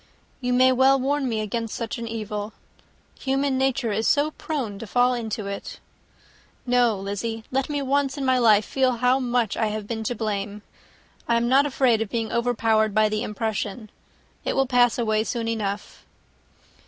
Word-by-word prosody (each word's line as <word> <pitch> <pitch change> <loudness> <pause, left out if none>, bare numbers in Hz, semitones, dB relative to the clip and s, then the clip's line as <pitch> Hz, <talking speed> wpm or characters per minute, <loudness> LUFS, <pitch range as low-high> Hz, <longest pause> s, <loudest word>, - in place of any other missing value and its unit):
"You 250 -1 -2
may 255 +1 +5
well 265 +1 +4
warn 275 0 0
me 220 -2 -1
against 225 +1 -3
such 230 +1 -4
an 230 - -5
evil. 215 -1 -4 0.7
Human 270 0 0
nature 265 -3 0
is 220 +2 0
so 295 +1 +3
prone 255 -12 -4
to 230 - -7
fall 245 +3 +3
into 220 -3 -3
it! 200 0 -6 0.9
No, 245 -3 +3
Lizzy, 210 +3 -4
let 270 +2 0
me 290 -1 -1
once 275 +1 0
in 275 - -2
my 260 -1 +3
life 215 -3 +5
feel 260 -2 +1
how 250 +2 +2
much 245 -4 0
I 220 - 0
have 215 0 -4
been 225 +1 -4
to 245 - -1
blame. 210 -1 -3 0.6
I 235 - +3
am 235 0 +1
not 275 +3 +4
afraid 255 -5 +2
of 225 - -2
being 225 -1 -2
overpowered 225 -3 +1
by 215 0 +4
the 215 0 -1
impression. 215 -1 -3 0.5
It - - -1
will 270 - +3
pass 245 -2 +3
away 220 -2 +1
soon 230 0 -3
enough." 210 -3 -4
235 Hz, 180 wpm, -24 LUFS, 215-260 Hz, 0.9 s, may